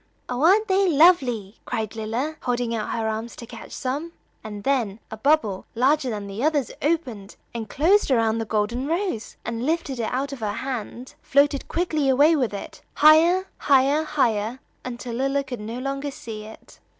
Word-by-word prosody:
"Oh, 250 +1 -3
aren't 400 +7 +5
they 385 -1 +3
lovely!" 265 - +3
cried 220 -1 -3
Lilla, 230 +8 -3
holding 245 -1 -1
out 215 -2 -3
her 225 -1 -1
arms 220 +2 -4
to 235 - -9
catch 230 -1 -11
some; 290 +6 -4 0.3
and 210 -2 -7
then 230 -6 0
a 220 - -6
bubble 220 -7 +1
larger 265 +3 +2
than 210 -3 -4
the 200 +5 -5
others 295 -4 +1
opened, 255 -11 -2 0.2
and 225 -3 -5
closed 360 +7 +3
around 230 -3 +2
the 225 - -2
golden 220 +5 -1
rose, 335 - -2
and 230 +1 -3
lifted 300 -3 -1
it 225 - -2
out 275 +3 -2
of 275 - -7
her 210 -2 -2
hand, 250 +1 -5
floated 280 0 +2
quickly 310 -5 0
away 290 +5 +5
with 250 -8 0
it, 200 - -8
higher, 330 +5 +6
higher, 280 +2 +3
higher, 240 -6 0 0.2
until 240 -1 -6
Lilla 275 +3 0
could 250 -4 -6
no 225 +3 -5
longer 275 +2 -3
see 220 -5 -8
it. 220 - -14
255 Hz, 175 wpm, -24 LUFS, 225-295 Hz, 0.3 s, higher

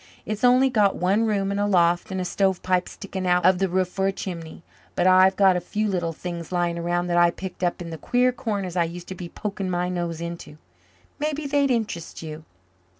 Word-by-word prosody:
It's 215 +1 -4
only 255 +2 +5
got 210 -5 +3
one 200 +5 +1
room 200 -2 0
and 200 - -1
a 205 - +1
loft 175 -3 +2
and 190 -1 -3
a 180 - -2
stovepipe 185 -1 0
sticking 190 -2 -5
out 180 -1 +3
of 185 -1 +5
the 195 -1 +1
roof 185 +1 +1
for 190 +1 -1
a - - +2
chimney. 170 -4 -7 0.3
But - - +1
I've 185 +1 +6
got 190 -2 +5
a 180 - -1
few 210 +5 -2
little 175 -4 -1
things 170 0 -6
lying 175 -1 0
around 175 +1 -1
that 175 -1 0
I 175 0 +6
picked 185 +1 -7
up 175 0 -1
in 170 - -8
the 160 - -7
queer 250 - +2
corners 200 -7 -3
I 170 -2 +2
used 175 +1 -8
to - - -4
be 175 -1 -7
poking 195 -1 -4
my 180 0 -1
nose 175 -2 -3
into. 170 -3 -7 0.6
Mebbe 300 0 -2
they'd 280 0 +2
interest 220 -10 -2
you." 155 0 -8
185 Hz, 220 wpm, -24 LUFS, 175-200 Hz, 0.6 s, I've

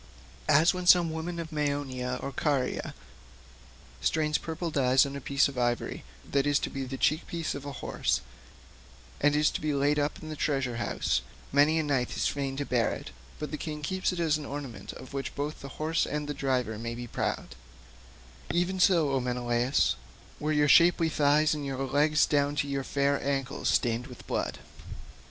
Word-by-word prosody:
As 160 +6 +6
when 180 -1 -4
some 175 -2 +6
woman 165 +2 -4
of 165 0 -5
Meonia 140 -4 -2
or 140 - -3
Caria 135 -2 -1 1.1
strains 155 -1 +1
purple 165 +1 -4
dye 130 -4 +2
on 140 - -4
to 140 - -5
a - - -7
piece 140 +1 +3
of 135 -3 -5
ivory 120 0 -1 0.2
that 140 0 +1
is 145 -1 +4
to - - -3
be 135 -1 -4
the 135 +1 -5
cheek 155 +5 +1
piece 165 -2 -3
of 140 0 -7
a - - -4
horse, 135 - -1 1.0
and 145 0 +3
is 150 0 +3
to - - -4
be 150 -1 0
laid 145 +2 +2
up 145 0 -1
in 155 - -6
a - - -4
treasure 135 -5 -1
house—many 145 +5 0
a 160 - +2
knight 135 -4 -1
is - - +1
fain 135 -1 -2
to 145 - -2
bear 120 -4 +1
it, - - -9 0.3
but 150 - -5
the 155 - -3
king 150 -1 -5
keeps 185 +6 0
it 180 - -4
as 155 -2 +2
an 150 - -7
ornament 140 -4 -6
of 130 - -11
which 135 -2 -4
both 145 +2 -4
horse 155 +4 -1
and 150 -1 -3
driver 125 -6 -1
may 115 +1 -4
be 120 +1 -6
proud—even 60 - -5
so, 170 -6 +4
O 135 - +2
Menelaus, 125 0 +1 0.4
were 150 +1 -1
your 150 -1 +3
shapely 170 +2 +6
thighs 150 0 +3
and 150 -1 -3
your 135 -2 -3
legs 150 +3 +3
down 145 0 +1
to 145 0 0
your 140 -1 -2
fair 140 +1 +1
ancles 135 -2 -2
stained 120 +1 +1
with 125 - -12
blood. - - -2
145 Hz, 185 wpm, -29 LUFS, 130-155 Hz, 1.1 s, As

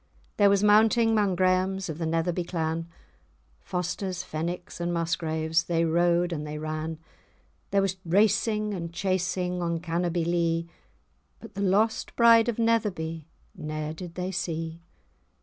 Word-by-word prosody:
There 205 -1 +6
was 200 0 +3
mounting 225 +2 +5
'mong 205 -4 +2
Graemes 185 +1 +1
of 160 -1 -5
the 165 - -1
Netherby 165 +2 0
clan; 165 -1 -2 0.7
Fosters, 180 - -3
Fenwicks, 175 +2 -5
and 175 0 -1
Musgraves, 165 -1 0
they 165 -1 +1
rode 175 +1 +2
and 150 -2 -3
they 150 0 -5
ran, 155 +1 -4 0.7
There 200 -1 +2
was 190 -1 -1
racing 210 +3 +2
and 170 -3 -5
chasing, 180 0 -1
on 170 -1 -1
Cannobie 170 0 -1
Lee, 170 -1 0 0.7
But 225 -2 -12
the 200 - -4
lost 205 +3 +1
bride 230 0 +6
of 235 - -2
Netherby 185 -9 0 0.3
ne'er 155 -2 -4
did 170 +1 -9
they 185 +1 -3
see. 165 -2 -4
175 Hz, 140 wpm, -27 LUFS, 165-195 Hz, 0.7 s, There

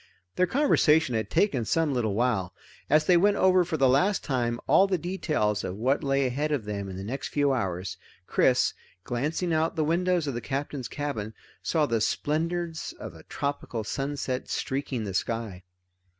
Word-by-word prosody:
Their 185 - +3
conversation 160 - +3
had 110 -2 -1
taken 160 - +2
some 155 +5 +1
little 110 -5 0
while. 110 -6 0 0.3
As 155 +1 +4
they 180 +1 +5
went 205 +3 +3
over 185 -1 +5
for 165 -2 -2
the 135 -2 +4
last 180 +10 +2
time 120 -4 -1
all 195 - +5
the 190 -2 +1
details 155 - -1
of 95 - -4
what 130 +7 0
lay 135 -1 +2
ahead 145 +5 -1
of 135 -8 -1
them 100 -2 -4
in 95 - -7
the 95 - -6
next 125 +7 -4
few 145 -2 +1
hours, 95 -6 -3 0.3
Chris, - - +3 0.3
glancing 155 - -1
out 160 +1 +1
the 160 - +1
windows 175 +1 +1
of 140 - -2
the 120 - -4
Captain's 135 0 -3
cabin, 115 -7 -4 0.3
saw 155 -3 +1
the 115 -5 0
splendors 165 +5 -1
of - - -7
a - - -13
tropical 140 -5 -4
sunset 135 +1 -3
streaking 135 -3 -2
the 100 -2 -4
sky. 110 -1 -2
140 Hz, 180 wpm, -27 LUFS, 115-160 Hz, 0.3 s, they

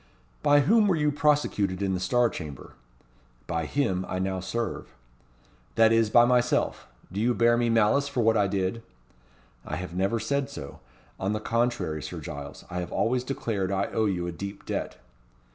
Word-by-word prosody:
"By 145 -1 +5
whom 215 - +4
were 190 - +3
you 150 -2 +1
prosecuted 145 - +1
in 95 -1 0
the 90 - -1
Star 120 +6 +2
Chamber?" 75 - -8 0.7
"By 80 -3 -2
him 95 - 0
I - - -2
now 95 0 -1
serve." 95 - -4 0.8
"That 115 0 +5
is, 115 -1 +3
by 120 +2 +6
myself. 125 0 +1 0.2
Do 100 +3 -2
you 120 +1 +2
bear 120 0 +4
me 120 0 +1
malice 115 +5 +3
for 140 -3 -1
what 115 0 +3
I 100 -2 +3
did?" 95 +3 -1 0.8
"I - - -4
have 90 -1 -6
never 95 +5 0
said 140 +3 -1
so. 70 - -8 0.4
On 95 +2 -1
the 105 - -1
contrary, 115 -9 -1
Sir - - -6
Giles, 70 0 -8
I 90 - -4
have 90 -1 -5
always 125 +2 +1
declared 110 -7 -2
I 100 0 -1
owe 110 -1 +2
you 90 -3 -1
a 85 - -3
deep 100 +4 -7
debt." - - -4
110 Hz, 180 wpm, -27 LUFS, 95-125 Hz, 0.8 s, by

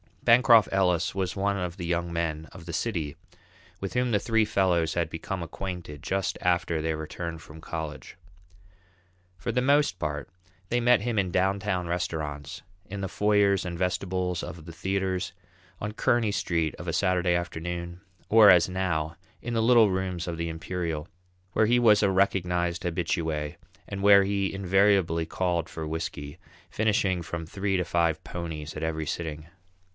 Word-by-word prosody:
Bancroft 120 -2 +6
Ellis 90 -3 +2
was 95 -2 -2
one 100 0 0
of 90 -1 -4
the 90 - -5
young 85 0 -1
men 80 -2 -2
of 85 -3 -11
the 85 - -6
city 85 -6 -2 0.6
with 95 - -5
whom 125 -1 +1
the 105 - +3
three 110 +1 +2
fellows 90 -6 +1
had 85 -1 0
become 90 +2 -4
acquainted 85 -4 -6
just 95 +3 -1
after 85 -2 +1
their 80 0 -1
return 85 +2 -5
from 80 0 -13
college. 80 0 -6 1.2
For 80 - -3
the 125 - +1
most 140 -7 +3
part, 75 -3 -3 0.4
they 120 - +2
met 120 -2 +4
him 115 -1 0
at 95 -2 0
downtown 95 -1 0
restaurants, 80 -4 -3 0.3
in 100 +1 -5
the 95 - -3
foyers 100 -2 +2
and 85 -1 -4
vestibules 90 -1 -1
of 80 -3 -8
the 85 - -8
theatres, 95 +2 -2 0.5
on 105 - -3
Kearney 115 0 +1
Street 85 -6 0
of 90 - -9
a 85 - -1
Saturday 90 0 +2
afternoon, 85 0 -4 0.3
or, 110 -1 +8
as 90 0 +6
now, 85 -4 -1 0.2
in 120 - -4
the 115 - +2
little 115 -3 +5
rooms 95 -2 -2
of 85 -1 -3
the 85 0 -2
Imperial, 80 -1 -4 0.5
where 110 - +4
he 120 +2 +4
was 110 -3 +5
a 100 - +3
recognized 90 -2 +1
habitué 80 -3 -2 0.3
and 100 0 -5
where 100 0 +7
he 100 0 0
invariably 95 -3 +2
called 85 -3 -1
for 80 - -5
whisky, 75 -1 -5 0.3
finishing 100 -4 +1
from 85 0 -5
three 95 +3 -2
to 90 - +1
five 85 -1 0
"ponies" 80 -5 -6
at 75 - -5
every 80 -1 -2
sitting. 80 -1 -4
90 Hz, 165 wpm, -27 LUFS, 85-100 Hz, 1.2 s, or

